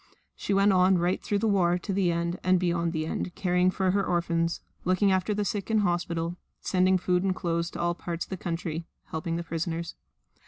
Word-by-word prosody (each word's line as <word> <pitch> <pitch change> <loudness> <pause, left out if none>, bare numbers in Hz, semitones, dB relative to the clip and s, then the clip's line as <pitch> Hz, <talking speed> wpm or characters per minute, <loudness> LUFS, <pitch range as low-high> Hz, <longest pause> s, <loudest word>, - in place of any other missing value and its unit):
She - - -4
went 200 0 +4
on 185 0 +5
right 175 +2 0
through 205 - 0
the 225 +2 +1
war 180 -4 +3
to 195 +2 -4
the 185 -2 +2
end 170 +1 -2
and 185 0 +4
beyond 170 -1 0
the 155 -2 -2
end, 175 +2 -3
caring 180 -1 +2
for 185 0 +1
her 200 +1 +1
orphans, 170 -2 0 0.2
looking 185 +2 +3
after 190 +2 +1
the 205 0 0
sick 200 0 -3
in 220 -1 +3
hospital, 175 -2 -1 0.2
sending 185 0 +3
food 180 0 +1
and 190 -1 0
clothes 170 -1 -1
to - - -8
all 175 0 +1
parts 170 -1 -4
of - - -27
the - - -1
country, 165 -2 -4 0.2
helping 165 +1 -2
the 170 - -2
prisoners. 170 0 -3
180 Hz, 210 wpm, -27 LUFS, 170-190 Hz, 0.2 s, on